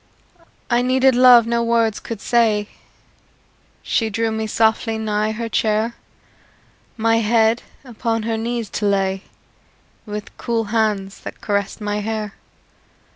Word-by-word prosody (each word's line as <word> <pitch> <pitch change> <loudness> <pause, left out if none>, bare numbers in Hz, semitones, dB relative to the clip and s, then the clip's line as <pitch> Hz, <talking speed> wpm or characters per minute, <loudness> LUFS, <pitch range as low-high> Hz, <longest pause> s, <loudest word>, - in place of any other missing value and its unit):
I 240 0 +2
needed 260 +1 +3
love 245 -2 +7
no 235 0 0
words 230 -2 +1
could 225 -3 -7
say; 220 -3 +2 1.1
She 225 -2 0
drew 225 +2 -1
me 220 0 -2
softly 220 +1 +1
nigh 215 0 -1
her 230 +1 -4
chair, 220 +1 0 1.0
My 225 0 +2
head 225 +1 +2 0.2
upon 230 -2 -2
her 225 0 -1
knees 230 0 -3
to 210 - -1
lay, 195 -1 0 0.9
With 210 0 -7
cool 230 -2 -1
hands 210 -3 0
that - - -9
caressed 200 0 -2
my 205 0 -2
hair. 215 -1 -3
225 Hz, 130 wpm, -20 LUFS, 210-235 Hz, 1.1 s, love